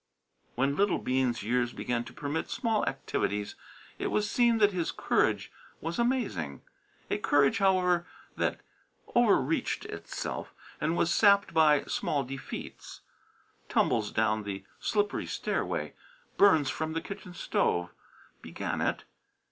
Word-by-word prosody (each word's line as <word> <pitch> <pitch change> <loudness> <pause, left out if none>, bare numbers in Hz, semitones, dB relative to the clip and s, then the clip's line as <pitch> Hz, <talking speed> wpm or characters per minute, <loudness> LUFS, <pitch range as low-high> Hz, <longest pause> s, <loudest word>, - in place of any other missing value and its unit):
When 135 +3 +1
little 200 +1 +2
Bean's 130 -3 0
years 120 +2 0
began 120 -1 -2
to - - -10
permit 145 +2 -3
small 225 -4 0
activities 105 0 -2 0.5
it - - -1
was 210 0 0
seen 235 +1 +3
that 205 -2 +5
his 175 -4 -1
courage - - +1 0.3
was 165 +5 -4
amazing: 210 - -1 0.5
a - - +1
courage, 140 -1 +3
however, 180 -3 +3 0.3
that - - -1 0.4
quickly 240 - +2
overreached 155 -3 +1
itself, - - -6 0.3
and 160 +3 0
was 170 - +2
sapped 200 -3 +5
by 155 -3 +5
small 145 -2 -1
defeats. 135 +1 -8 0.7
Tumbles - - +2
down 110 0 +1
the 100 -2 -6
slippery 205 -1 0
stairway, - - -2 0.4
burns 160 -9 +5
from 160 0 -3
the 165 - -1
kitchen 195 -3 -8
stove, 90 - 0 0.5
began - - -4
it. - - 0
160 Hz, 130 wpm, -29 LUFS, 125-200 Hz, 0.7 s, that